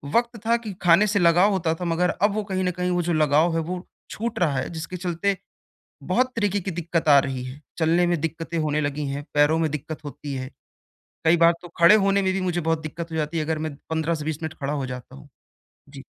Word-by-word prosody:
वक़्त 235 0 +1
था 230 +1 +4
कि 220 -4 -7
खाने 175 +4 +5
से 205 0 +1
लगाव 175 +3 +5
होता 165 -4 0
था, 180 - -5
मगर 175 +1 +1
अब 205 0 +1
वो 215 - -1
कहीं 190 -2 -2
न 180 - +1
कहीं, 180 +1 -2
वो 175 - +1
जो 175 0 -1
लगाव 155 +2 +3
है, - - +2
वो 180 +3 -5 0.2
छूट 230 +1 -4
रहा 155 -6 +1
है, 130 - -2
जिसके 170 +2 -6
चलते 185 +2 -1 0.7
बहुत 255 0 +1
तरीके 205 -2 +1
की 190 - -4
दिक्कत 170 -1 -2
आ 140 - +8
रही 130 -2 -3
है। 130 +4 -9 0.2
चलने 170 +2 +3
में 175 -2 +1
दिक्कतें 165 +1 -3
होने 155 0 0
लगी 145 0 -2
हैं, 140 +1 -4
पैरों 145 +2 +4
में 160 - +1
दिक्कत 150 +1 -6
होती 145 0 -6
है। 130 0 -5 0.8
कई 165 +2 +5
बार 170 0 +6
तो 175 - -9
खड़े 170 +5 +8
होने 200 0 +3
में 190 - +1
भी 190 - -1
मुझे 175 -1 -1
बहुत 165 0 0
दिक्कत 165 +2 -6
हो 160 - -4
जाती 155 +2 -1
है, 155 - 0
अगर 160 0 -1
मैं 155 -2 -4
15 160 +1 0
से 150 -2 -5
20 160 0 -4
मिनट 160 0 -4
खड़ा 140 +1 -2
हो 140 -3 -2
जाता 125 0 -8
हूँ। 145 +1 -14 0.6
जी। 140 -1 -11
165 Hz, 245 wpm, -24 LUFS, 150-180 Hz, 0.8 s, आ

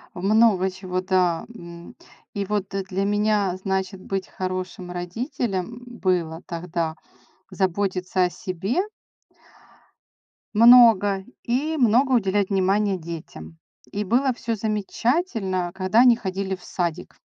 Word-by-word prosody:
Много 200 0 +3
чего, 185 -1 -4
да. 180 -3 +1
М. 170 -5 -11 0.4
И 200 -1 -2
вот, 200 -1 -3
э, 195 0 -1
для 190 +1 -2
меня, 205 -2 +1
значит, 190 0 -3
быть 195 0 -4
хорошим 185 -1 -5
родителем 220 +4 -4
было 180 -8 -1
тогда 165 -1 -3 0.5
заботиться 185 0 0
о - - 0
себе 190 - -2 1.7
много 215 -4 +6 0.2
и 290 +7 -1
много 250 +3 +4
уделять 200 -3 +1
внимания 195 +1 +1
детям. 155 - -9 0.3
И 205 - -2
было 250 +6 +2
всё 230 -1 -3
замечательно, 210 - -1
когда 190 +4 +2
они 245 -2 +7
ходили 190 -2 -3
в 185 - -18
садик. 175 -1 -4
190 Hz, 115 wpm, -23 LUFS, 185-220 Hz, 1.7 s, они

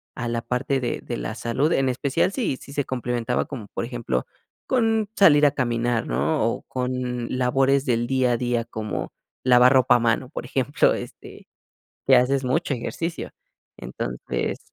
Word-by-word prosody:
a 120 -1 -4
la 115 0 -2
parte 135 +3 -1
de 125 - -2
de - - -4
la - - -4
salud, 135 +7 0
en 135 -4 +2
especial 140 +8 0
si 200 - -1
si 140 - -12
se 145 -2 -1
complementaba 125 -1 -2
con, 120 -8 -8
por - - -3
ejemplo, 115 - -3 0.4
con 225 -4 +1
salir 150 -6 +6
a 145 - +5
caminar, 120 -3 -1
¿no?, 70 - 0
o 115 - -1
con 125 -1 -3
labores 135 +2 +2
del 120 -2 0
día 130 -1 +2
a 120 - +1
día 120 -1 -1
como 110 -2 -5 0.3
lavar 125 +1 +6
ropa 130 -2 +5
a - - +3
mano, 115 +2 0
por 130 - -6
ejemplo, 135 +2 +2
este, - - -10 0.6
que 130 - +7
haces 130 +2 +2
mucho 130 +3 0
ejercicio. 165 +7 -4 0.5
Entonces - - -4
125 Hz, 165 wpm, -24 LUFS, 120-135 Hz, 0.6 s, que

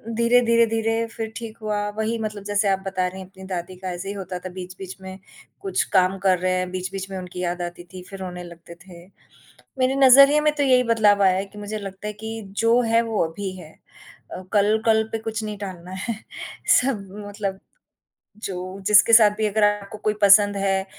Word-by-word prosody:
धीरे, 235 +2 +4
धीरे, 235 -1 +4
धीरे 225 0 0
फिर 225 -1 -6
ठीक 230 -1 -8
हुआ, 210 -1 -2 0.2
वही 220 +1 -1
मतलब 210 -2 -5
जैसे 205 0 0
आप 195 -1 +1
बता 185 -1 -1
रही 185 +1 -8
हैं 185 - -10
अपनी 190 0 -14
दादी 185 -1 -5
का, 185 0 -6
ऐसे 180 +2 -6
ही - - -3
होता 185 -2 -6
था, - - -4
बीच-बीच 185 +1 -8
में 190 0 -9 0.4
कुछ 390 -2 0
काम 185 +1 +3
कर 185 -2 +2
रहे 185 +1 0
हैं, 185 0 -2
बीच-बीच 185 +1 -5
में 190 - -4
उनकी 180 -1 -8
याद 175 0 -2
आती 175 0 -6
थी, 185 - -8
फिर 195 - -9
रोने 180 -1 -6
लगते 170 0 -12
थे। 175 -2 -13 0.7
मेरे 255 +1 +2
नज़रिए 275 +2 +7
में 300 0 +2
तो 290 - 0
यही 255 -2 +4
बदलाव 215 -4 +3
आया 190 -1 +4
है 195 - -2
कि 205 +1 -13
मुझे 205 +1 -5
लगता 195 0 -8
है 210 - -4
कि 220 +2 -7 0.2
जो 230 +2 +4
है, 230 -1 +2
वो 225 -4 0
अभी 190 +4 -6
हैं 160 -3 -13 0.6
अ, - - -6
कल 210 +1 +3
कल 220 -1 +4
पे 225 - -1
कुछ 225 0 -4
नहीं 210 -1 -5
टालना 185 -3 -8
है, 190 +4 -4 0.7
सब 240 -7 -2 0.2
मतलब 200 -2 -4 0.9
जो 185 0 -6
जिसके 210 +2 +6
साथ 220 -2 +8
भी 220 - 0
अगर 210 +1 0
आपको 205 0 -2
कोई 215 - +2
पसंद 205 0 +6
है 195 -1 0
200 Hz, 210 wpm, -23 LUFS, 185-225 Hz, 0.9 s, साथ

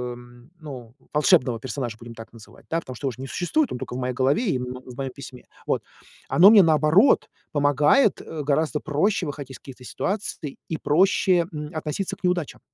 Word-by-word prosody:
м, 120 +3 -16
ну, 125 -7 -9 0.2
волшебного 130 -5 +3
персонажа, 120 -2 -5
будем 120 0 -10
так 115 0 -11
называть, 115 -1 -16
да, 165 - 0
потому 130 -5 -9
что 140 - -7
его - - 0
ж 120 - -13
не 135 - -5
существует, 180 - 0
он 125 - -4
только 125 - -6
в - - -3
моей 125 0 -2
голове 135 - +1
и 130 - -1
в - - -5
м 125 0 -7
в 125 -2 -11
моем 135 -1 -3
письме, 130 -1 -11 0.2
вот. - - 0 0.5
Оно 195 +5 +7
мне, 215 -3 +8
наоборот, 160 - +4 0.3
помогает, 145 - +3
э, 155 -2 -6
гораздо 150 +1 0
проще 190 +8 0
выходить 140 -2 -7
из 130 - -9
каких-то 130 -2 -13
ситуаций, 190 - -4
и 160 - -2
проще, 175 +2 +2
м, 150 -1 -6
относиться 155 +4 -3
к - - -31
неудачам. 180 -4 -1
145 Hz, 205 wpm, -24 LUFS, 125-165 Hz, 0.5 s, мне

